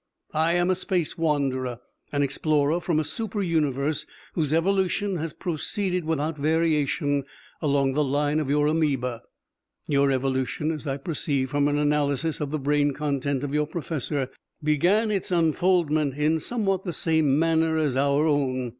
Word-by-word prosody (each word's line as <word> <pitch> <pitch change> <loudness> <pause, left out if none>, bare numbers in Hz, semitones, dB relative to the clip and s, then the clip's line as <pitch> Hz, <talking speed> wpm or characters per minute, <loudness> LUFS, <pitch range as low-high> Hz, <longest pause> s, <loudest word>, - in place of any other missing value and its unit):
I 160 +2 +2
am 175 +1 +2
a - - +2
Space 180 -3 -1
Wanderer, 135 -6 -1 0.3
an 145 -1 +1
explorer 150 +3 +1
from 165 -3 +1
a - - +1
super 210 +4 -3
universe 150 -4 0 0.3
whose 155 -4 -1
evolution 190 +3 +1
has 165 0 -3
proceeded 180 +2 -2
without 155 -1 -1
variation 150 -2 +1 0.4
along 140 -3 +2
the 150 +2 +2
line 145 +2 +1
of 150 -3 -2
your 145 +1 +2
amoeba. 140 -6 0 0.6
Your 140 -1 +2
evolution, 130 +3 0
as 155 -1 -6
I 135 0 -1
perceive 140 -3 -2
from 145 0 +2
an 145 0 +1
analysis 150 +1 0
of 145 - -2
the 155 - -1
brain 145 0 +1
content 140 -2 -1
of 145 -1 -3
your 150 0 +1
professor, 150 -4 -3 0.3
began 180 +9 +2
its 195 -3 -1
unfoldment 165 -4 +2
in 155 +2 +1
somewhat 195 -1 -1
the 175 - -4
same 160 -5 +2
manner 160 0 +2
as 150 -5 +1
our 140 +2 +2
own. 130 -5 0
150 Hz, 155 wpm, -25 LUFS, 140-165 Hz, 0.6 s, I